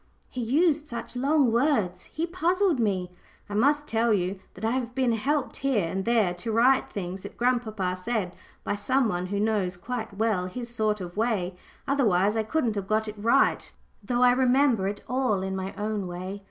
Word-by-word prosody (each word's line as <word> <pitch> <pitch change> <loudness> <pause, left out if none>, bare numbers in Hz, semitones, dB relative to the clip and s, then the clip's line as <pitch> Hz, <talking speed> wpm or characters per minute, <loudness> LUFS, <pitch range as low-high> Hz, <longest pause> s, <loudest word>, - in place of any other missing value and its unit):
He 255 - -4
used 300 +5 +2
such 235 0 -7
long 275 0 +3
words, 225 - +1
he 320 - -3
puzzled 355 -1 +1
me. 190 -5 0 0.4
(I 205 - -7
must 290 +7 +2
tell 230 +1 +1
you 190 -1 0 0.2
that - - -5
I 225 - +1
have 245 -1 -2
been 260 -3 +2
helped 275 +5 -1
here 250 -10 +1
and 190 +3 -3
there 225 -6 +2
to 180 +6 -5
write 250 +4 +3
things 190 -1 -5
that - - -10
grandpapa 220 -7 0
said 185 -1 -3 0.3
by - - -1
some 255 +5 +1
one 180 -3 -2
who 200 +2 -2
knows 205 -4 0
quite 220 +1 -5
well 210 -5 +1
his 235 +5 -6
sort 215 -3 0
of 175 +1 -7
way, 210 -6 0 0.3
otherwise 210 -8 +2
I 220 - +2
couldn't 230 +1 0
have 200 -2 -4
got 220 +1 +1
it 210 - -4
quite 205 -1 -12
right, 255 +4 +3 0.3
though 245 +4 +1
I 250 - +7
remember 255 -4 +3
it 200 +1 -4
all 250 -7 0
in 190 0 -3
my 190 0 -3
own 210 -2 -2
way.) 185 +3 -6
220 Hz, 195 wpm, -26 LUFS, 195-255 Hz, 0.4 s, I